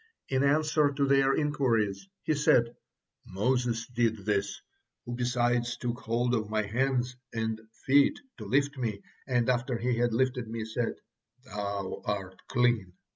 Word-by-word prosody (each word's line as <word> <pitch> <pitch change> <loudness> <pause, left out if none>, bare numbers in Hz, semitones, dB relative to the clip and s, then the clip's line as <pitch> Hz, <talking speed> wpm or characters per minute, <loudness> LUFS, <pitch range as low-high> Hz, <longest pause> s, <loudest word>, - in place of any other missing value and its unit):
In 130 -1 +1
answer 150 0 +3
to 140 0 +1
their 135 0 +4
inquiries 135 - 0 0.2
he 155 - +1
said, 120 -5 +3 0.5
"Moses 115 +3 0
did 115 -5 -1
this, 100 -2 0 0.5
who 120 - -5
besides 120 0 0
took 120 0 -3
hold 120 +2 0
of 110 -3 0
my 110 0 +1
hands 125 +3 0 0.2
and 110 -1 -2 0.2
feet 140 +1 +4 0.2
to - - -7
lift 140 +1 +1
me, 110 -5 -3 0.2
and 120 -3 +1
after 125 0 +1
he 125 +1 0
had 120 0 +2
lifted 125 0 0
me, 110 0 -4
said, 115 +1 -2 0.5
'Thou 100 -3 -4
art 95 -2 -3
clean.' 120 -7 +1
120 Hz, 145 wpm, -29 LUFS, 110-130 Hz, 0.5 s, their